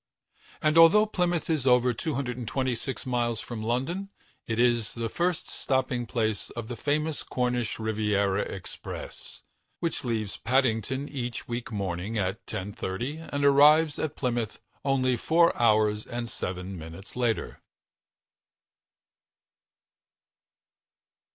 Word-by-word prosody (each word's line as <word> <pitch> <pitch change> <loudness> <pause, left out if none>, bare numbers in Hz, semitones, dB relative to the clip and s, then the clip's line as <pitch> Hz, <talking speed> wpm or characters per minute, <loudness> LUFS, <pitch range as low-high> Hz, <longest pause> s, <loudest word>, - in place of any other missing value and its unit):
And 155 +1 +5
although 190 +6 +8
Plymouth 175 -5 0
is 155 -5 0
over 125 0 +5
226 130 -1 -2
miles 120 -3 0
from 115 -2 -6
London, 135 - -1 0.4
it 115 - -1
is 120 -2 +2
the 115 -1 -2
first 175 +4 -1
stopping 130 -3 0
place 110 -4 -1
of 115 -1 -7
the 120 - -3
famous 150 +5 -1
Cornish 125 -3 -1
Riviera 105 -3 +1
Express, 95 -2 -7 0.4
which 170 - -2
leaves 110 -5 -2
Paddington 130 +2 +1
each 125 -5 -5
week 120 0 -4
morning 100 +1 -3
at 95 +1 -1
10.30 105 - -4
and 145 0 0
arrives 150 +2 +6
at 155 -1 -2
Plymouth 120 -4 -2 0.2
only 130 -2 +2
four 170 +7 +4
hours 105 -2 +3
and 120 0 -4
seven 90 -3 -4
minutes 80 +5 -9
later. 120 -3 -1
120 Hz, 110 wpm, -28 LUFS, 110-140 Hz, 0.4 s, although